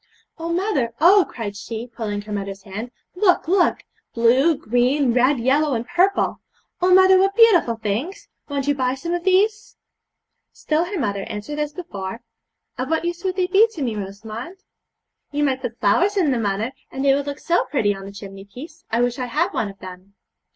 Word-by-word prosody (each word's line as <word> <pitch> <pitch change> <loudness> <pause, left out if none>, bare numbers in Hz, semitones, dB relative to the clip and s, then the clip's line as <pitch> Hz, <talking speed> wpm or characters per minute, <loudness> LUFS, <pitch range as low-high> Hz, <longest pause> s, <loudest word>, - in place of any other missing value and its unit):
'Oh, 335 +1 -3
mother, 340 - 0
oh!' 370 +5 +6
cried 210 -4 -6
she, 220 +3 -6
pulling 215 -4 -5
her 210 - -10
mother's 200 -1 -5
hand, 210 +5 -6 0.2
'look, 360 -2 +2
look! 360 +1 +2 0.3
blue, 255 +7 +4
green, 255 0 +1
red, 255 +3 +3
yellow, 275 +3 +2
and 230 +1 -4
purple! 370 +3 +1 0.4
Oh, 365 +1 +3
mother, 375 0 +7
what 390 +1 +2
beautiful 395 - +5
things! 225 - -4 0.2
Won't 280 -1 -2
you 290 - +3
buy 260 -2 -1
some 335 +6 -4
of 350 -1 -2
these?' 405 +3 +1 0.8
Still 315 +2 0
her 385 +2 -5
mother 200 -6 -2
answered 210 +9 -6
as 300 -1 -1
before: 210 - -7 0.6
'Of 255 +2 -2
what 320 +1 0
use 345 0 -3
would 370 -1 -1
they 370 -1 +1
be 390 +5 +5
to 310 - -4
me, 235 -4 -2
Rosamond?' 215 - -7 0.7
'You 295 0 0
might 265 -2 0
put 240 -2 -6
flowers 355 - +2
in 335 -7 +3
them, 245 -3 0
mother, 210 +3 -1 0.2
and 270 +1 -3
they 275 - +5
would 280 +1 -1
look 285 0 -4
so 345 +3 +1
pretty 210 -8 +1
on 195 0 -9
the 200 - -8
chimney 195 -1 -10
piece. 285 +10 -12
I 230 +2 +1
wish 245 +1 -1
I 250 - -2
had 335 +10 0
one 210 - -1
of 195 - -12
them.' 185 +1 -12
265 Hz, 195 wpm, -21 LUFS, 220-345 Hz, 0.8 s, mother